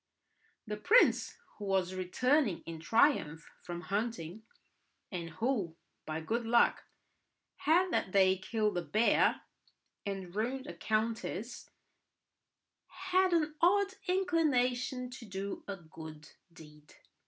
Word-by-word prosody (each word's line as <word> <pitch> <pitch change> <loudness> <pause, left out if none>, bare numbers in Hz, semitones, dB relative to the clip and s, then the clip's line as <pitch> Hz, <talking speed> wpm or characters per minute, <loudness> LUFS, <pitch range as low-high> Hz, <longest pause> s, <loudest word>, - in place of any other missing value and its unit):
The 210 -1 -4
prince, 445 - +4 0.2
who 205 - -5
was 190 -2 0
returning 205 - +1
in 165 -1 -7
triumph 170 - +2
from 175 -1 -6
hunting, 205 -2 -3 0.7
and 170 -3 -4
who, 210 -4 -1 0.3
by 155 +1 -3
good 230 +9 -1
luck, 235 +1 +3 0.7
had 355 +4 +3
that - - 0
day 190 -1 +4
killed 210 -2 0
a - - -3
bear 220 +6 +2 0.6
and 190 -3 -5
ruined 255 +5 -2
a - - -7
countess, 225 +1 -2 1.2
had 375 0 +1
an 315 -3 +1
odd 390 +3 +4
inclination 260 -9 +1
to 250 -2 -9
do 195 0 -5
a 200 - -3
good 160 -3 -11 0.2
deed. 150 -2 -16
215 Hz, 115 wpm, -32 LUFS, 180-265 Hz, 1.2 s, prince